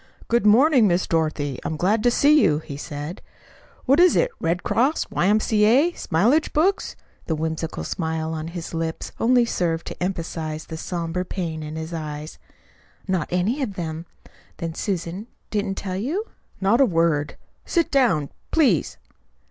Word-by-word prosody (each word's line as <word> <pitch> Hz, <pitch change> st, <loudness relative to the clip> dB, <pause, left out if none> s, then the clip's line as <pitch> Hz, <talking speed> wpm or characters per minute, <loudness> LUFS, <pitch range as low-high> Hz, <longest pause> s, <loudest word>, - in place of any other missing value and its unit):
"Good 235 Hz, -2 st, +2 dB
morning, 250 Hz, +2 st, +6 dB
Miss 180 Hz, 0 st, +1 dB
Dorothy. 155 Hz, -4 st, -1 dB
I'm 160 Hz, -, -3 dB
glad 205 Hz, +7 st, +2 dB
to 245 Hz, -, +4 dB
see 290 Hz, +5 st, +5 dB
you," 150 Hz, -, +3 dB
he 150 Hz, -2 st, -7 dB
said. 145 Hz, +4 st, -6 dB, 0.6 s
"What 275 Hz, +5 st, +4 dB
is 360 Hz, 0 st, +6 dB
it, -, -, +2 dB
Red 170 Hz, +2 st, -1 dB
Cross, 270 Hz, +7 st, +1 dB
Y.M.C.A., 215 Hz, -, +3 dB
Smileage 235 Hz, -, +1 dB
Books?" 370 Hz, +6 st, +1 dB, 0.3 s
The 160 Hz, -, 0 dB
whimsical 160 Hz, -, -3 dB
smile 160 Hz, -, -2 dB
on 155 Hz, 0 st, -4 dB
his 170 Hz, 0 st, -7 dB
lips 165 Hz, 0 st, -3 dB
only 245 Hz, +1 st, +4 dB
served 170 Hz, -6 st, -1 dB
to -, -, -5 dB
emphasize 160 Hz, -4 st, -3 dB
the 160 Hz, -, -7 dB
somber 170 Hz, +1 st, -3 dB
pain 170 Hz, -4 st, -4 dB
in 155 Hz, 0 st, -6 dB
his 160 Hz, +1 st, -5 dB
eyes. 155 Hz, -1 st, -6 dB, 0.7 s
"Not 185 Hz, -5 st, 0 dB
any 195 Hz, +11 st, 0 dB
of 215 Hz, -7 st, -3 dB
them. 165 Hz, -1 st, -5 dB, 0.5 s
Then 165 Hz, -1 st, -4 dB
Susan 185 Hz, +2 st, -3 dB, 0.2 s
didn't 205 Hz, -2 st, -1 dB
tell 185 Hz, -2 st, -4 dB
you?" 310 Hz, -, -2 dB, 0.3 s
"Not 205 Hz, +7 st, +3 dB
a -, -, +7 dB
word. 165 Hz, -4 st, +1 dB, 0.3 s
Sit 335 Hz, -2 st, 0 dB
down, 190 Hz, -, +2 dB, 0.2 s
please." 315 Hz, -5 st, +2 dB
180 Hz, 155 wpm, -23 LUFS, 160-230 Hz, 0.7 s, a